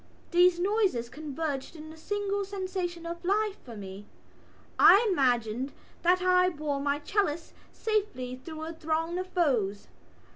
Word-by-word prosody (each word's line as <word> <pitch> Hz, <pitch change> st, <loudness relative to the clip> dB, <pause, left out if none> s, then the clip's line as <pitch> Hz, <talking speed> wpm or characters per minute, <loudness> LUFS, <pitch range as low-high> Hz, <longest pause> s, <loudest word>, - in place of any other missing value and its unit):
These 355 Hz, 0 st, +5 dB
noises 375 Hz, -, +1 dB
converged 295 Hz, +1 st, -4 dB
in 315 Hz, 0 st, -9 dB
a -, -, -12 dB
single 405 Hz, +4 st, -2 dB
sensation 370 Hz, -3 st, -4 dB
of 340 Hz, +1 st, -6 dB
life 410 Hz, +2 st, +1 dB
for 235 Hz, -4 st, -10 dB
me: 195 Hz, 0 st, -9 dB, 0.7 s
I 420 Hz, +4 st, +8 dB
imagined 250 Hz, -, +1 dB, 0.3 s
that 365 Hz, +1 st, +3 dB
I 365 Hz, 0 st, +4 dB
bore 295 Hz, -4 st, -3 dB
my 285 Hz, 0 st, 0 dB
chalice 330 Hz, 0 st, -1 dB, 0.2 s
safely 405 Hz, -, -2 dB
through 315 Hz, 0 st, -7 dB
a 325 Hz, +1 st, -5 dB
throng 325 Hz, +2 st, -1 dB
of 370 Hz, -, -4 dB
foes. 250 Hz, -, 0 dB
330 Hz, 140 wpm, -29 LUFS, 280-370 Hz, 0.7 s, I